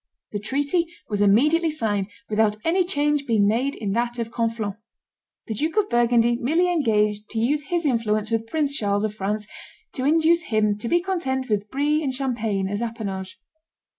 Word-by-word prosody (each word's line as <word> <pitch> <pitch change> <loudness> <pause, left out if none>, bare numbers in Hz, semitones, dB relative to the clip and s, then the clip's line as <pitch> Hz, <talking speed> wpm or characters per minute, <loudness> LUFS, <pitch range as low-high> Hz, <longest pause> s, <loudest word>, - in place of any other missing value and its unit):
The 205 - -3
treaty 285 - 0 0.2
was 205 -1 -1
immediately 300 - +4
signed, 210 -10 -1 0.2
without 210 0 +1
any 360 +3 +3
change 295 -4 0
being 215 -4 +3
made 250 +6 +1
in 205 -3 -3
that 240 +3 -1
of 230 -1 -3
Conflans. 230 -3 -1 0.7
The 220 - -4
Duke 310 - -2
of 415 -1 +2
Burgundy 240 0 +3
merely 325 +9 +1
engaged 210 -9 +1
to 225 - -3
use 285 +6 +1
his 345 +1 -1
influence 220 -4 0
with 225 0 0
Prince 285 +1 0
Charles 205 -4 0
of 215 -1 -1
France 210 +1 -3 0.5
to 255 - -4
induce 325 +2 +3
him 215 -2 +1
to 230 - -4
be 345 - +3
content 265 -9 -2
with 210 -1 -1
Brie 295 +4 +1
and 270 - 0
Champagne 225 -7 -1
as 205 +3 -3
appanage. 200 -5 -5
235 Hz, 175 wpm, -23 LUFS, 210-295 Hz, 0.7 s, immediately